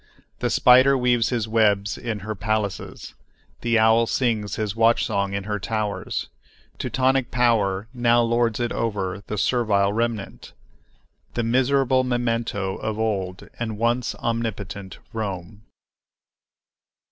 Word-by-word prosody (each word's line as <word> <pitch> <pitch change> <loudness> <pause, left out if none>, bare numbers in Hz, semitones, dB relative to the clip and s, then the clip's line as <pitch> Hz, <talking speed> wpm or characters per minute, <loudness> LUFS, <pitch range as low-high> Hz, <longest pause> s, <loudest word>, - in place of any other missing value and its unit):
The - - 0
spider 130 +2 +6
weaves 120 -2 +2
his 115 -4 -1
web 105 -3 +3 0.2
in 115 -4 -3
her 110 +2 -4
palaces; 105 -1 -3 0.5
the 115 -1 +2
owl 110 +1 +4
sings 110 -5 0
his 105 -1 -3
watch 115 +1 +3
song 100 0 -1
in 100 - -3
her 105 0 -3
towers. 105 0 -3 0.5
Teutonic 130 -1 +1
power 110 -5 +1
now 120 -1 +3
lords 115 -1 +1
it 120 -1 -1
over 100 -4 -2
the 105 - -4
servile 100 -4 +2
remnant, 115 -2 -3 0.8
the 120 - 0
miserable 130 +2 +2
memento 115 -6 -1
of 110 -1 -3
old 95 -5 -2
and 110 -3 -3
once 120 +2 0
omnipotent 100 -4 -4 0.2
Rome. 105 -1 -5
115 Hz, 125 wpm, -23 LUFS, 100-120 Hz, 0.8 s, spider